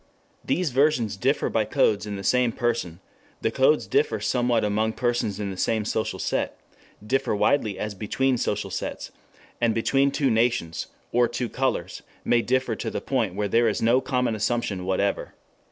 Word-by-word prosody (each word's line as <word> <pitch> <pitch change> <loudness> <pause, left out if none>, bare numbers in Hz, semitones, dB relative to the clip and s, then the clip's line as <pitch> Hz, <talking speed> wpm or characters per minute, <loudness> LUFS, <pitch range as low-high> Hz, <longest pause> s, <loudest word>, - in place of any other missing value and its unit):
These 175 -4 0
versions 125 -6 +2
differ 130 +8 +1
by 110 - +1
codes 105 0 +1
in 105 - -4
the 100 - -6
same 125 +3 +3
person, 115 -9 -2 0.4
the 110 - +1
codes 135 +5 +3
differ 445 +2 +1
somewhat 120 -3 +1
among 110 +2 0
persons 120 -5 -1
in 100 -2 -3
the 95 - -7
same 110 +2 0
social 110 +1 -1
set, - - -2 0.5
differ 130 0 0
widely 105 -2 +1
as 105 -1 -3
between 125 +6 0
social 100 -2 -2
sets, - - -5 0.5
and 115 -2 +2
between 135 +4 +2
two 140 -2 +1
nations, 110 -8 0 0.2
or 120 0 +3
two 120 0 -3
colors, 130 +1 -2 0.2
may 120 - +3
differ 130 -1 0
to - - -3
the - - -3
point 115 -9 -1
where 105 0 -1
there 115 +3 +3
is 105 - -2
no 120 +3 +3
common 125 -3 0
assumption 110 -3 -1
whatever. 95 +1 -1
115 Hz, 170 wpm, -25 LUFS, 105-130 Hz, 0.5 s, same